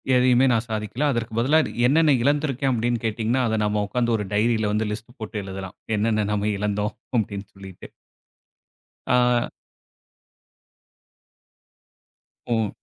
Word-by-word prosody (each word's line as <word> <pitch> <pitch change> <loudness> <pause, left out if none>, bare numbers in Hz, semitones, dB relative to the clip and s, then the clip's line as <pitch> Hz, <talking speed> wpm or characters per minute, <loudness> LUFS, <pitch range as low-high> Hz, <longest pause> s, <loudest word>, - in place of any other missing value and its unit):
எதையுமே 125 +1 +4
நான் 115 0 +1
சாதிக்கல, 110 +6 -2
அதற்கு 115 -2 -3
பதிலா 145 +6 +4 0.3
என்னென்ன 155 +1 +4
இழந்திருக்கேன் 140 -2 +1
அப்படினு 120 -1 -1
கேட்டீங்கனா, 115 +3 0
அதை 110 -1 0
நம்ம 105 0 0
உட்கார்ந்து 120 +1 0
ஒரு 105 - -3
டைரில 110 0 +2
வந்து 110 0 0
லிஸ்ட் 115 +3 -7
போட்டு 110 -1 -5
எழுதலாம், 95 -1 -7 0.2
என்னென்ன 110 -1 +1
நம்ம 105 0 0
இழந்தோம் 105 +1 -1 0.3
அப்டின்னு 100 -1 -4
சொல்லிட்டு. 95 -2 -11 1.2
ஆ. 125 -1 +3 3.0
உ. 115 -3 +1
110 Hz, 115 wpm, -23 LUFS, 105-125 Hz, 3.0 s, எதையுமே